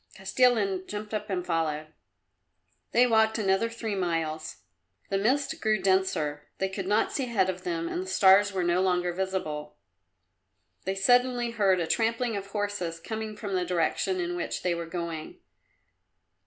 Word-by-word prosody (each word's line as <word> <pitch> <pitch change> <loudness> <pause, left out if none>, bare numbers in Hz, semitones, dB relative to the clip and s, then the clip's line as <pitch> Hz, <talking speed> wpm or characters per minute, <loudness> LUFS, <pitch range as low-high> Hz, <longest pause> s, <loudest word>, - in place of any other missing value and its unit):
Kostilin 195 -2 +2
jumped 210 +1 -6
up 210 0 -3
and 180 -2 -2
followed. 160 -3 -1 1.1
They 245 - +5
walked 220 -2 +3
another 195 +1 +1
three 230 -2 -4
miles. 165 -4 -2 0.5
The 195 - +2
mist 280 +9 0
grew 215 -1 +2
denser; 180 -7 0
they 190 - -1
could 190 -1 -5
not 210 +2 +2
see 275 - -1
ahead 195 -6 +1
of 185 0 -11
them 165 -1 -2
and 175 - -2
the 190 - -6
stars 190 +2 +5
were 190 -2 -1
no 175 +1 +2
longer 180 -1 +1
visible. 175 -6 -3 1.1
They 190 - -1
suddenly 245 +4 +3
heard 200 -5 +3
a 170 - 0
trampling 230 +4 0
of 200 -1 -4
horses 200 -5 -3
coming 220 +3 -5
from 205 -2 -5
the 180 -1 +1
direction 180 +2 0
in 175 0 -2
which 175 - -3
they 180 - +1
were 170 -1 -4
going. 165 -2 -5
190 Hz, 160 wpm, -28 LUFS, 175-215 Hz, 1.1 s, They